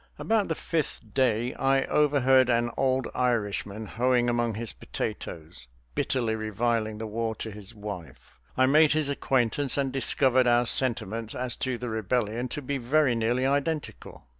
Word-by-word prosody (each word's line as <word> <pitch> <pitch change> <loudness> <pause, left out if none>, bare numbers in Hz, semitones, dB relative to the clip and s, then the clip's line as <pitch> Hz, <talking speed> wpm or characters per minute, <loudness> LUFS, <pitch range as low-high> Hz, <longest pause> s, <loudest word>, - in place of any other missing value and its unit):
About 220 -2 +1
the 160 - -1
fifth 150 -11 -3
day 120 -1 +1
I 135 0 +2
overheard 135 -3 +3
an 120 0 +2
old 130 0 +1
Irishman, 110 -3 -1
hoeing 120 +2 +1
among 120 -2 0
his 115 +1 -5
potatoes, 80 - -6 0.3
bitterly 115 - 0
reviling 110 0 -1
the 110 - -5
war 110 +1 -2
to 110 - -6
his 105 -1 -10
wife. 100 - -9 0.2
I 130 - +5
made 150 +3 +5
his 155 -2 +1
acquaintance 135 0 0
and 135 -2 0
discovered 130 -1 +3
our 120 0 +4
sentiments 115 -3 0
as 125 -1 0
to 130 -2 -2
the 125 0 -5
rebellion 110 +2 -1
to 150 +3 -6
be 140 +1 -2
very 135 +2 +2
nearly 120 +3 0
identical. 145 - -2
120 Hz, 155 wpm, -27 LUFS, 110-135 Hz, 0.3 s, I